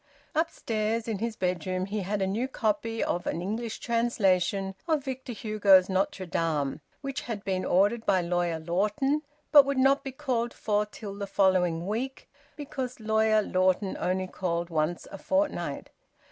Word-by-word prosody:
Upstairs 230 -8 -1
in 215 -4 -2
his 230 0 -2
bedroom 185 0 -1
he 205 +2 -3
had 200 +1 -1
a - - +2
new 215 +7 -1
copy 225 -2 -1
of 175 - -2
an - - -1
English 220 +5 -3
translation 195 -5 +1
of 310 -4 +1
Victor 260 -2 -5
Hugo's 205 -4 +4
"Notre 190 0 0
Dame," 155 -4 -1 0.2
which 275 -1 -4
had 220 -4 -5
been 185 -1 -1
ordered 205 +5 +2
by 185 - +4
Lawyer 175 -1 0
Lawton, 210 - 0 0.3
but 290 -2 +10
would 280 0 -2
not 270 +2 +4
be 270 - -5
called 250 -4 -2
for 210 -1 0
till 210 -1 -8
the 200 0 -5
following 180 -4 +2
week, 240 +7 -3 0.3
because 265 -4 -5
Lawyer 220 0 +3
Lawton 185 +1 +1
only 185 +1 0
called 175 -2 -3
once 160 +2 -1
a 195 - -8
fortnight. 290 +1 -1
210 Hz, 160 wpm, -28 LUFS, 185-235 Hz, 0.3 s, but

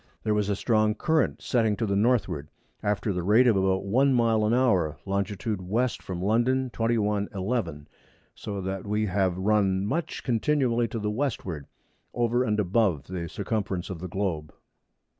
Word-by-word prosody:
There 110 - +1
was 105 -1 0
a 100 - +1
strong 110 0 +2
Current 160 +7 0
setting 115 -4 +2
to 115 - 0
the 100 -2 0
Northward, 100 - +1 0.3
after 105 0 0
the 90 - -2
rate 105 +8 +4
of 120 -4 +4
about 95 0 +1
1 130 +6 +3
Mile 115 -2 +3
an - - +1
Hour, 95 - +2
Longit. 100 +1 -1 0.2
W. 105 +8 0
from 90 -1 -5
London. 125 +5 +1
21. 105 -3 0
11. 95 -7 -2 0.5
So 100 -2 -5
that 95 +1 -4
we 105 +1 0
have 95 -2 0
run 100 -1 +2
much 165 +11 -3
continually 120 -1 +1
to 115 - -5
the 105 -1 -1
Westward, 105 - -3 0.5
over 120 +1 +2
and 105 -3 0
above 95 -6 +1
the 85 -3 -4
Circumference 100 -3 -3
of 90 - -6
the 90 - -5
Globe. 85 -5 -2
105 Hz, 165 wpm, -27 LUFS, 95-115 Hz, 0.5 s, rate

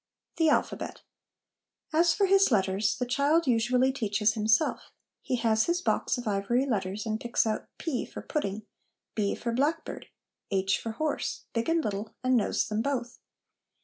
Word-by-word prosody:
The 325 -1 +4
Alphabet. - - -1 0.9
As 335 +2 +4
for 400 +4 +2
his 390 -4 +4
letters, 200 0 +1
the 250 - -1
child 285 +7 +2
usually 250 +1 +3
teaches 215 -4 +1
himself. 220 +7 +1 0.3
He 255 - -1
has 220 -2 +2
his 345 +1 +1
box 360 - 0
of 245 -2 -6
ivory 210 +6 +1
letters, 205 -4 -2
and 220 0 -2
picks 240 -1 +1
out 215 -1 -2
p 310 -7 -2
for - - -8
pudding, 215 - -3 0.5
b 205 -2 0
for 235 - -3
blackbird, 295 +7 -1 0.4
h 195 -1 +1
for 225 - -5
horse, 310 +6 -2
big 230 +5 -1
and 330 -1 +2
little, 210 +1 -4
and 255 0 +3
knows 225 - +1
them 215 +1 -1
both. 245 -2 -3
235 Hz, 160 wpm, -28 LUFS, 215-280 Hz, 0.9 s, The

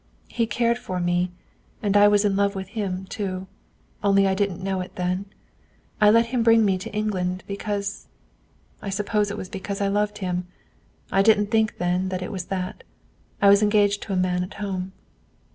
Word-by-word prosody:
He 230 -1 0
cared 235 +1 +1
for 185 -5 -4
me; 175 +1 +1 0.5
and 205 -1 +1
I 205 0 +7
was 205 0 +4
in 200 -1 +2
love 200 0 +1
with 190 -1 -5
him 195 -4 -3
too. 190 -1 -4 0.6
Only 195 -1 +4
I 190 - +2
didn't 190 -2 -1
know 190 -1 -1
it 180 - -8
then. 180 +2 -1 0.8
I 210 - +7
let 230 +2 +5
him 245 - +2
bring 225 -1 +5
me 190 -2 +1
to - - -7
England, 185 -4 -2
because 200 0 -4 0.7
I 200 - -5
suppose 210 +1 0
it 205 - -5
was 185 - -5
because 195 +1 -5
I 200 -1 +1
loved 210 +1 0
him. 180 -2 -3 0.6
I 195 - +4
didn't 205 0 +4
think 220 -1 +2
then 180 +1 0
that 185 -1 -3
it 180 - -5
was 185 -3 -4
that. 185 -1 -4 0.6
I 200 - +8
was 200 +1 +6
engaged 205 -1 +3
to 200 - -4
a - - +1
man 180 -1 +1
at 180 - -8
home." 190 -2 -4
200 Hz, 195 wpm, -24 LUFS, 185-210 Hz, 0.8 s, I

